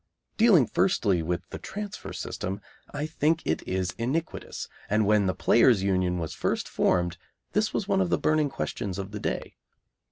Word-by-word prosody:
Dealing 215 - +6
firstly 105 - +2
with 85 +2 -3
the - - -6
transfer 205 0 -6
system, 95 +2 -4 0.3
I 145 +1 -3
think 155 +1 +1
it 80 - 0
is 95 -1 -1
iniquitous, 145 +8 -3 0.2
and 105 +1 +3
when 105 -1 +3
the 95 - 0
Players' 115 -4 +4
Union 90 -2 +1
was 80 -2 -3
first - - -1
formed 85 -1 +1 0.3
this 215 +1 +1
was 200 - -2
one 195 -2 +2
of 185 - +1
the - - +2
burning 155 -1 +2
questions 100 -7 -4
of 100 0 -5
the 105 - -5
day. - - -4
105 Hz, 170 wpm, -27 LUFS, -, 0.3 s, Dealing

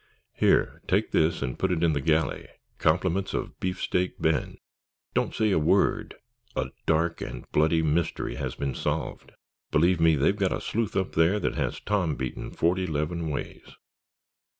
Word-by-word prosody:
"Here, - - +2
take - - +1
this 80 -2 +2
and 65 -2 -4
put 95 - +1
it 85 -1 0
in 80 -2 +4
the 70 - -1
galley, 80 +1 +1 0.3
compliments 90 +4 +1
of - - -4
Beefsteak 90 0 -1
Ben.... 80 -1 0 0.6
Don't - - 0
say 110 -1 +2
a 85 - +3
word, 75 - +2 0.4
a - - -2 0.2
dark 85 +2 +1
and 60 - -6
bloody 80 +2 +3
mystery 80 +2 0
has - - -4
been 70 -2 -2
solved. - - -3 0.4
Believe 85 +3 +3
me, 80 -1 +5
they've 75 +8 +2
got 95 -3 +1
a - - -2
sleuth 115 -2 -2
up 95 -1 0
there 85 +6 +3
that - - 0
has - - -2
Tom 90 -7 0
beaten 65 -2 -4
forty 90 +2 0
'leven 80 +2 -2
ways." 75 - -6
80 Hz, 165 wpm, -27 LUFS, 80-90 Hz, 0.6 s, me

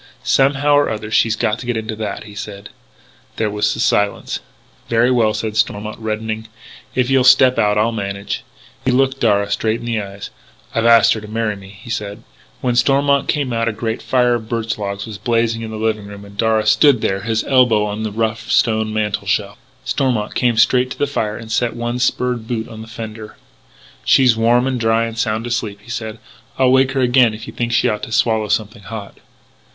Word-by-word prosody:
"Somehow 135 - +3
or 145 0 +4
other 105 0 -5
she's 110 0 +3
got 110 +1 -1
to 120 - -8
get 120 -2 -1
into 110 0 -4
that," 105 -2 -4
he 105 -1 -12
said. 105 -1 -8 0.7
There 110 -2 -1
was 105 0 0
a - - -7
silence. 105 0 0 0.5
"Very 115 +2 +3
well," 115 -4 +3
said 110 0 -3
Stormont, 105 0 -1
reddening.... 110 0 -4 0.5
"If 125 +1 +1
you'll 135 -1 +4
step 130 0 +6
out 105 0 +2
I'll 110 +2 +2
manage...." 100 -2 -4 0.4
He - - 0
looked 135 +1 +2
Darragh 100 -3 +2
straight 110 +2 0
in - - -9
the 115 -2 -1
eyes: 100 0 -8 0.4
"I - - 0
have 115 - +2
asked 115 -1 +6
her 110 - -5
to 105 - -10
marry 110 -1 -2
me," 95 -1 -12
he 115 +2 -9
said. 105 +1 -4 0.4
When 125 -2 0
Stormont 140 +3 +3
came 140 -4 -1
out 115 0 0
a - - +2
great 110 +1 -3
fire 125 -1 +2
of 110 -2 -3
birch 115 -2 -2
logs 100 -1 -4
was 105 -3 -8
blazing 115 +1 0
in 110 - -5
the 110 - -6
living 110 -2 -1
room, 100 0 -10
and 100 0 -14
Darragh 110 0 +1
stood 110 +3 +4
there, 95 0 -1
his 110 +1 -1
elbow 125 -6 +3
on 105 +1 -4
the 110 -1 -3
rough 110 +1 -2
stone 110 -1 +2
mantel 105 -2 -2
shelf. 100 0 -1 0.3
Stormont 125 -6 0
came 120 -2 +1
straight 125 +3 +4
to - - -7
the 145 - +1
fire 110 -7 -2
and 110 -1 -9
set 120 0 0
one 120 +1 -3
spurred 125 -2 0
boot 115 -2 -3
on 110 -1 -9
the 110 - -10
fender. 110 -1 -8 0.7
"She's 125 -3 +5
warm 120 +2 +3
and 130 -2 -1
dry 115 0 +2
and 115 -1 -6
sound 110 0 -1
asleep," 115 -4 -2
he 120 - -10
said. 110 -2 -5 0.4
"I'll 130 -1 +4
wake 130 0 +3
her 135 - 0
again 125 -3 +4
if 110 +2 -9
you - - -9
think 120 0 -2
she 115 - +3
ought 105 - -1
to - - -6
swallow 110 -1 +1
something 110 +1 -2
hot." 105 -1 -8
110 Hz, 215 wpm, -18 LUFS, 105-120 Hz, 0.7 s, step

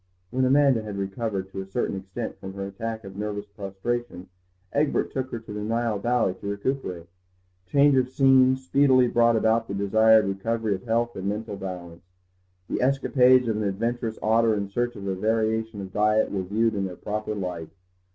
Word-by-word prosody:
When 130 +1 +1
Amanda 135 -2 +4
had 105 -2 -6
recovered 100 0 -3
to 95 - -5
a - - -7
certain 100 +1 -2
extent 95 +4 -6
from 95 0 -8
her 100 0 -4
attack 110 +3 -5
of 95 -1 -10
nervous 105 0 -4
prostration 100 0 -5 0.4
Egbert 145 +1 +1
took 130 -1 -3
her 120 - -4
to 110 -2 -9
the 105 - -4
Nile 115 0 -1
Valley 120 -3 +1
to - - -6
recuperate. 100 -5 -3 0.6
Change 140 +6 +4
of 130 -1 +2
scene 130 -1 +5
speedily 130 -1 +3
brought 120 0 +3
about 110 +1 +2
the 100 - -4
desired 110 +2 +4
recovery 110 +3 -1
of 95 +3 -6
health 120 +1 0
and 95 +1 -3
mental 105 0 -4
balance. 90 -3 -7 0.7
The - - -2
escapades 130 -1 +4
of 110 -2 0
an 110 - -1
adventurous 115 +3 -2
otter 115 0 +3
in 100 -1 -3
search 120 +4 -1
of 100 - -8
a 95 - -1
variation 110 +2 -1
of 95 0 -8
diet 105 +1 +2
were 100 - -1
viewed 110 +5 0
in 100 -2 -1
their 90 -1 -6
proper 105 +2 -4
light. 90 -5 -5
110 Hz, 185 wpm, -25 LUFS, 100-120 Hz, 0.7 s, scene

